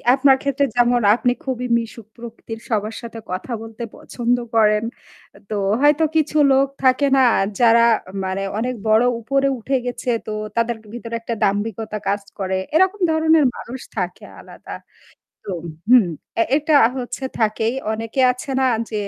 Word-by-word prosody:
আপনার 270 -1 +4
ক্ষেত্রে 280 0 +1
যেমন 245 0 +3
আপনি 245 0 +1
খুবই 250 -2 -3
মিশুক 230 -2 -7
প্রকৃতির। 230 -1 -9
সবার 215 0 -1
সাথে 230 -1 -8
কথা 185 +7 -5
বলতে 225 +1 -8
পছন্দ 240 +1 -1 0.2
করেন। 215 -1 +4 0.7
তো 210 - -2 0.2
হয়তো 295 +2 +4
কিছু 310 -1 +1
লোক 270 +1 +4 0.2
থাকে 260 +2 +4
না 265 - +5 0.4
যারা 235 -1 +5 0.4
মানে 190 +1 -2 0.2
অনেক 250 +2 -2
বড় 220 +2 +5 0.2
উপরে 275 +4 0
উঠে 265 +4 0
গেছে; 245 0 -4 0.2
তো - - -3 0.2
তাদের 230 +1 0 0.2
ভিতরে 235 -1 -6
একটা 230 0 -4
দাম্ভিকতা 215 +1 -1
কাজ 200 +1 0 0.2
করে। 190 -1 -1 0.2
এরকম 375 +4 +3
ধরনের 315 -1 +4
মানুষ 255 +3 -8 0.2
থাকে 180 -2 -4 0.2
আলাদা। - - -10 0.7
তো 195 - -2 0.4
হুম, 245 -6 +6 0.5
এটা 300 0 +3 0.2
হচ্ছে 250 +2 -5 0.2
থাকেই। 220 +1 +1 0.2
অনেকে 225 +4 -2
আছে 250 +4 -9
না 265 - +3 0.2
য্‌ - - -13
235 Hz, 150 wpm, -20 LUFS, 220-265 Hz, 0.7 s, হুম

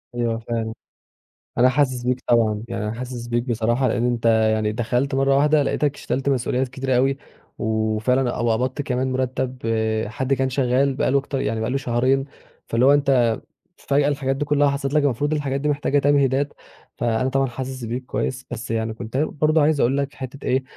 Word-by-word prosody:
أيوهَ 120 -1 0
فاهم. 115 -1 -3 0.8
أنا 125 +1 +6
حاسس 130 -2 +1
بيك 125 +1 -1
طبعًا، 110 -3 +2
يعني - - -4
أنا 105 +1 -2
حاسس 120 0 -6
بيك 120 0 0
بصراحة 120 +1 0
لأن 120 0 0
أنت 120 -1 -2
يعني 110 -1 +3
دخَلت 120 +4 -1
مَرّة 135 0 +3
واحدة 150 +1 +4
لقيتك 145 +1 0
شلت 135 +1 -2
مسؤوليات 130 0 0
كتيرة 130 +1 -2
أوي 135 +2 +2 0.4
وفعلًا 110 +4 0
أو 120 -1 +1
قبَضت 130 +5 -1
كمان 130 -1 -1
مُرتّب 130 0 -2 0.5
حد 130 +5 -1
كان 135 0 +1
شغّال 130 +1 +1
بقي 130 - +1
له 140 - +4
أكتر 135 -1 -3
يعني 110 -3 -1
بقي 110 - -1
له 135 - 0
شهرين 130 +1 +1 0.4
فاللي 115 +2 +2
هو 140 - +7
أنت 130 -5 +3 0.4
فجأة 140 +1 +1
الحاجات 135 -2 0
دي 145 +2 -2
كلّها 145 0 +3
حصَلت 140 0 -2
لك 150 -1 +3
المفروض 145 +2 0
الحاجات 140 -2 -1
دي 150 - 0
محتاجة 145 0 +1
تمهيدات، 140 0 +2 0.4
فأنا 120 +2 0
طبعًا 135 0 +1
حاسس 130 +1 -6
بيك 125 +3 -4
كويّس. 130 0 -3
بس 120 0 -5
يعني 110 0 -1
كنت 115 +2 -8
أنا 145 +3 +2
برضه 155 +1 +1
عايز 150 0 +3
أقول 130 +3 +2
لك 140 0 -2
حتّة 130 +1 -8
إيه، 130 +1 +1
130 Hz, 190 wpm, -22 LUFS, 120-140 Hz, 0.8 s, هو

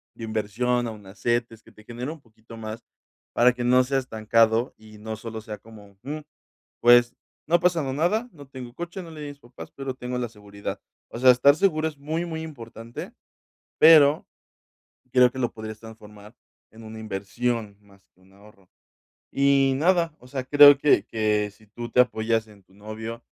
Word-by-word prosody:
de 115 - -10
inversión, 115 +3 -1
a - - -4
una 100 -3 -13
CETES, 115 +2 -2
que - - -19
te 110 - -18
genere 120 +6 -6
un 160 -3 -11
poquito 115 -1 -16
más 110 0 -7 0.5
para 125 +1 +5
que 125 0 -5
no 125 +1 +4
sea 135 +1 -1
estancado 115 -1 +1
y 110 -1 -16
no 110 +1 -6
solo 110 0 -8
sea 105 -1 -8
como 105 -3 -16
"Mm, 150 +3 -5 0.6
pues 120 0 +5 0.3
no 170 - +4
ha 175 - -5
pasado 165 -7 +1
nada, 190 - 0
no 145 -4 -14
tengo 125 -3 -9
coche, 175 +4 -6
no 165 - -11
le 155 - -10
di 150 - -6
a - - -6
mis 140 - -18
papás, 120 -1 -12
pero 135 -1 -5
tengo 125 0 -5
la 120 -1 -2
seguridad". 100 -2 -8 0.3
O - - -7
sea, 130 +1 +7
estar 135 +3 +5
seguro 160 -4 +1
es 150 -3 -12
muy, 160 +4 -3
muy 160 -2 -5
importante, 115 -6 -9 0.7
pero 155 -1 +6 0.9
creo 125 -1 +5
que 130 - -8
lo 120 - 0
podrías 110 -1 -8
transformar 105 0 -14 0.3
en 110 0 -14
una 110 0 -9
inversión 110 +1 -3
más 100 -2 -24
que - - -31
un 95 +1 -24
ahorro. 100 -1 -20 0.6
Y 140 -1 +3
nada, 170 +1 +2
o 125 - -16
sea, 130 -1 -4
creo 145 +1 +8
que 140 -8 +3
que 105 -2 0
si 110 +2 -23
tú 120 +3 -8
te 125 - +4
apoyas 115 -2 +1
en 100 -2 -18
tu 95 - -27
novio, 110 +3 -8
120 Hz, 190 wpm, -24 LUFS, 110-140 Hz, 0.9 s, creo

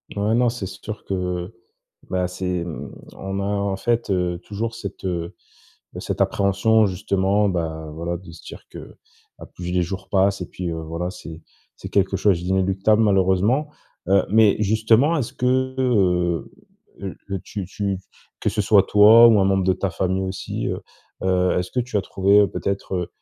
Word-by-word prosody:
Ouais 105 +2 +1
non, 120 0 +3
c'est 115 -4 -5
sûr 105 +3 -8
que, 90 0 -3 0.6
bah, 90 -1 0
c'est 90 -1 -3
mmh 85 - -7 0.2
on 95 0 -5
a, 100 - -2
en 100 -1 -1
fait, 120 +2 -1
heu, 90 -2 0
toujours 115 +3 -4
cette, 100 -4 -8
heu, 85 -2 -3 0.6
bah, - - -7
cette - - -4
appréhension, 100 +3 +3
justement, 100 +1 +1
bah, 80 -4 -3
voilà, 85 +2 -3
de 85 -1 -13
se 80 - -14
dire - - -10
que, - - -11 0.4
à - - -10
plus 90 0 -7
les 90 0 +1
jours 95 +2 -5
passent 95 0 +2
et - - -3
puis, 90 -1 -5
heu, 80 -1 -4
voilà, 85 +3 -4
c'est 85 -3 -10 0.4
c'est - - -8
quelque 95 -1 +1
chose 95 -3 +2
d'inéluctable, 95 +3 +2
malheureusement. 100 +7 +2 0.4
Heu, 100 -1 +4
mais, 110 0 +4
justement 110 +9 +3
est-ce 130 -6 -3
qu' 125 - -3
heu, 120 - +1 0.5
le 95 0 -6
tu 100 -3 -6
tu 100 +1 -3 0.4
que - - +1
ce 110 - -4
soit 100 -1 +5
toi 110 +4 +7
ou 110 -3 +5
un 95 - +3
membre 95 0 +2
de 95 - +3
ta 100 - -2
famille 95 +1 -1
aussi, 95 0 -4
heu - - -3 0.4
heu, 90 -1 +2
est-ce 90 0 -3
que 125 - -1
tu 125 -2 -4
as - - +1
trouvé, 100 +2 +3
peut-être, 100 0 -4
heu 90 -1 -2
95 Hz, 180 wpm, -22 LUFS, 90-105 Hz, 0.6 s, toi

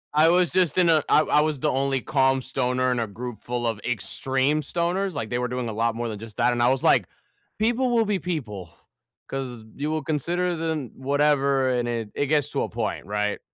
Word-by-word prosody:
I 160 +2 +6
was 180 -1 +3
just 185 -3 +2
in 175 -2 +4
a 155 -2 +4
I 155 - +6
I 150 - +3
was 155 -3 -1
the - - +1
only 135 0 0
calm 135 0 +2
stoner 130 -1 0
in 125 - 0
a 115 - -1
group 115 +2 -7
full 120 0 -3
of 115 -3 -1
extreme 135 +5 -1
stoners 175 +5 -1
like, 115 -7 -4
they 120 - -1
were 125 - -1
doing 125 -1 -3
a 110 - -4
lot 115 +1 0
more 120 0 -3
than 105 - -6
just 110 0 -11
that 120 +1 +3
and 120 - -1
I 120 - +5
was, 130 0 0
like, - - +4 0.5
"People 240 +4 +2
will 230 -2 +3
be 205 -2 0
people 115 - -4 0.6
'cause 125 -4 -5
you 145 +2 -2
will 155 -2 -2
consider 175 +4 -1
then" 160 -5 -3
whatever, 140 -1 +2
and 120 -1 0
it 115 -3 -3
it 145 - 0
gets 150 -1 +1
to - - -1
a - - -4
point, - - -3
right? 105 0 -1
135 Hz, 225 wpm, -25 LUFS, 120-155 Hz, 0.6 s, I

